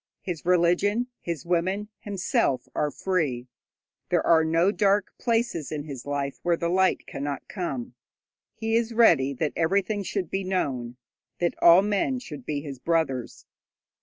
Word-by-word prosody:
His 175 Hz, -3 st, -5 dB
religion, 180 Hz, +7 st, +2 dB
his 170 Hz, -4 st, -5 dB
women, 185 Hz, +4 st, 0 dB
himself, 190 Hz, -9 st, 0 dB
are 150 Hz, -, 0 dB
free; 145 Hz, -9 st, -1 dB, 0.6 s
there -, -, +1 dB
are 165 Hz, -1 st, +5 dB
no 165 Hz, +4 st, +3 dB
dark 205 Hz, -1 st, +1 dB
places 230 Hz, -, 0 dB
in 150 Hz, -2 st, -3 dB
his 140 Hz, -3 st, -8 dB
life 140 Hz, -1 st, -2 dB
where 175 Hz, -1 st, +1 dB
the 170 Hz, -, -1 dB
light 190 Hz, +1 st, +2 dB
cannot 140 Hz, -1 st, -5 dB
come. 140 Hz, -, -4 dB, 0.6 s
He 225 Hz, +1 st, -1 dB
is 230 Hz, 0 st, 0 dB
ready 160 Hz, -, +5 dB
that 150 Hz, +3 st, -2 dB
everything 195 Hz, +5 st, +1 dB
should 195 Hz, -2 st, -3 dB
be 195 Hz, 0 st, -1 dB
known, 130 Hz, -10 st, -2 dB, 0.4 s
that 175 Hz, -1 st, 0 dB
all 170 Hz, +3 st, +8 dB
men 210 Hz, +5 st, 0 dB
should 150 Hz, -, -9 dB
be 145 Hz, -2 st, -2 dB
his 140 Hz, -3 st, -8 dB
brothers. 150 Hz, -7 st, -1 dB
170 Hz, 150 wpm, -26 LUFS, 145-200 Hz, 0.6 s, all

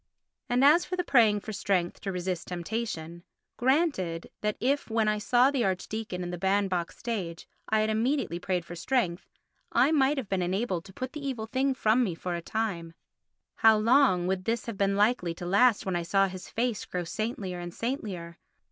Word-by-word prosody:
And 250 Hz, +2 st, +3 dB
as 310 Hz, +5 st, +6 dB
for 365 Hz, -, -4 dB
praying 220 Hz, -9 st, +4 dB
for 220 Hz, -, -6 dB
strength 185 Hz, -3 st, -1 dB
to 195 Hz, -, -3 dB
resist 180 Hz, -1 st, -3 dB
temptation—granted 180 Hz, -, -2 dB
that 210 Hz, 0 st, -1 dB
if, 275 Hz, +3 st, 0 dB
when 220 Hz, -1 st, +1 dB
I 210 Hz, 0 st, +1 dB
saw 245 Hz, +5 st, +4 dB
the 270 Hz, -4 st, 0 dB
archdeacon 190 Hz, 0 st, -3 dB
in 175 Hz, -, -4 dB
the 175 Hz, -, -5 dB
band 195 Hz, +1 st, +1 dB
box 175 Hz, -2 st, -2 dB
stage, 185 Hz, -8 st, -4 dB, 0.2 s
I 220 Hz, 0 st, +3 dB
had 215 Hz, 0 st, +1 dB
immediately 225 Hz, -, 0 dB
prayed 180 Hz, -2 st, -2 dB
for 175 Hz, -, -8 dB
strength 180 Hz, -1 st, -1 dB, 0.4 s
I 255 Hz, +5 st, +4 dB
might 285 Hz, -1 st, +3 dB
have 260 Hz, -6 st, -3 dB
been 190 Hz, -1 st, -1 dB
enabled 185 Hz, -1 st, -1 dB
to 190 Hz, -, -13 dB
put 255 Hz, +5 st, -5 dB
the 300 Hz, -2 st, -7 dB
evil 255 Hz, -5 st, -3 dB
thing 260 Hz, +4 st, 0 dB
from 230 Hz, +1 st, +3 dB
me 185 Hz, -8 st, -2 dB
for 180 Hz, +1 st, -4 dB
a 170 Hz, -, -3 dB
time, 170 Hz, -5 st, -3 dB, 0.6 s
how 220 Hz, -1 st, +6 dB
long 225 Hz, -5 st, +4 dB
would 185 Hz, 0 st, -1 dB
this 230 Hz, 0 st, -1 dB
have 230 Hz, -, -5 dB
been 195 Hz, 0 st, +1 dB
likely 205 Hz, -5 st, +2 dB
to 175 Hz, -, -7 dB
last 205 Hz, +5 st, +4 dB
when 190 Hz, -2 st, -1 dB
I 175 Hz, -, 0 dB
saw 195 Hz, +3 st, +2 dB
his 185 Hz, -1 st, -8 dB
face 235 Hz, -1 st, -1 dB
grow 180 Hz, -1 st, -3 dB
saintlier 195 Hz, 0 st, -4 dB
and 175 Hz, 0 st, -6 dB
saintlier? 190 Hz, -, -4 dB
205 Hz, 190 wpm, -28 LUFS, 180-240 Hz, 0.6 s, as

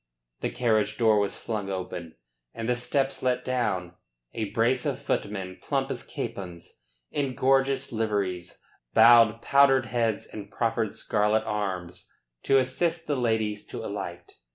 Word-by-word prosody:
The -, -, -1 dB
carriage 110 Hz, -3 st, +1 dB
door 110 Hz, -3 st, +4 dB
was 100 Hz, -1 st, -1 dB
flung 105 Hz, -4 st, -4 dB
open 90 Hz, -3 st, -5 dB, 0.4 s
and 115 Hz, 0 st, -4 dB
the 125 Hz, -, +2 dB
steps 135 Hz, +3 st, 0 dB
let 125 Hz, 0 st, 0 dB
down. 95 Hz, -9 st, -1 dB, 0.4 s
A 110 Hz, -3 st, -3 dB
brace 120 Hz, +4 st, +1 dB
of 140 Hz, -4 st, -1 dB
footmen, 95 Hz, -7 st, -3 dB
plump -, -, -1 dB
as -, -, -4 dB
capons, 90 Hz, -3 st, -7 dB, 0.4 s
in 135 Hz, -3 st, -2 dB
gorgeous 135 Hz, +1 st, +2 dB
liveries, 100 Hz, -6 st, -2 dB, 0.4 s
bowed 115 Hz, 0 st, +7 dB
powdered 135 Hz, -2 st, +5 dB
heads 115 Hz, -2 st, -1 dB
and 105 Hz, -1 st, -9 dB
proffered 115 Hz, -2 st, -1 dB
scarlet 105 Hz, +1 st, +1 dB
arms 95 Hz, -5 st, -4 dB, 0.4 s
to 135 Hz, -, +5 dB
assist 160 Hz, +6 st, 0 dB
the 145 Hz, -, 0 dB
ladies 110 Hz, -4 st, 0 dB
to -, -, -6 dB
alight. 95 Hz, -4 st, -6 dB
110 Hz, 140 wpm, -27 LUFS, 100-125 Hz, 0.4 s, bowed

